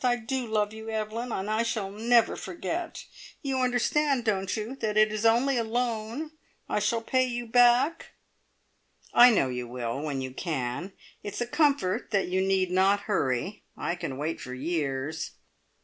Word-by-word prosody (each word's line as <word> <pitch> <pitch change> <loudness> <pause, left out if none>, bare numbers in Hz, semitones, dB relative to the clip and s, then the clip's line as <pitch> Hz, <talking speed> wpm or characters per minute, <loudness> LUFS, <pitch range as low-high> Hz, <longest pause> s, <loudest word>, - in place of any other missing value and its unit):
I 245 -1 +3
do 245 +2 -3
love 210 -1 0
you, 220 0 -8
Evelyn, 220 +2 -3
and 195 -2 -2
I 215 +1 +1
shall 220 -4 -2
never 230 +3 +3
forget! 190 - -5 0.4
You 270 -2 -1
understand, 255 +1 +1
don't 195 -2 0
you, 220 +5 -4
that 215 -4 -1
it 215 0 +4
is 215 +1 +2
only 245 +4 +3
a 235 - +1
loan? 235 +5 -2 0.4
I - - 0
shall 230 +3 0
pay 255 +2 +2
you 240 -1 -3
back!" 245 +6 +4 1.1
"I 245 +1 +9
know 195 - +2
you 125 -1 -4
will, 120 +2 -4
when 145 -3 -2
you 130 0 -4
can. 150 +4 -3 0.3
It's 205 0 -6
a 240 - 0
comfort 250 - +1
that 200 -4 +1
you 185 +1 +1
need 190 -1 +1
not 195 +2 +3
hurry. 185 - -1 0.2
I - - -1
can 135 -7 -5
wait 155 +3 -3
for 125 0 -6
years." 145 0 -2
215 Hz, 170 wpm, -28 LUFS, 180-240 Hz, 1.1 s, I